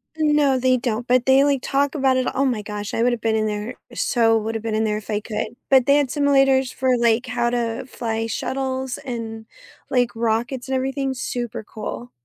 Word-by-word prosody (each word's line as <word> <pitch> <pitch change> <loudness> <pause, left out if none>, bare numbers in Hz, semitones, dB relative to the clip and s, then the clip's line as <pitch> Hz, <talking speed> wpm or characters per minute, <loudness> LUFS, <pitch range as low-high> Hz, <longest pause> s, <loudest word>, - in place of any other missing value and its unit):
No, 295 -3 +3
they 255 0 +3
don't, 240 -1 -2
but 250 0 +3
they, 265 +1 +6
like, 280 -2 +2
talk 280 +1 0
about 265 -3 +2
it. 255 - +1
Oh 275 - +1
my 240 -5 0
gosh. 210 0 -5
I 230 - +1
would 245 - +3
have 240 -2 -3
been 225 -1 +1
in 215 0 +1
there 210 +3 -3 0.2
so 225 -2 +2
would 220 +1 -4
have 225 - -4
been 225 -1 -2
in 220 - +1
there 210 -1 0
if 215 +1 -10
I 210 - 0
could. 215 +1 -4
But 265 -2 +5
they 280 +2 +5
had 290 -2 +2
simulators 270 -3 +3
for, 260 0 -1
like, 235 +1 +2
how 240 -1 0
to 235 0 -2
fly 225 -2 -3
shuttles 260 +2 -3
and, 225 -3 -6 0.5
like, 245 -2 +3
rockets 235 +3 -1
and 265 - 0
everything. 270 +1 -1
Super 240 -3 -4
cool. 120 - -7
245 Hz, 215 wpm, -22 LUFS, 225-265 Hz, 0.5 s, they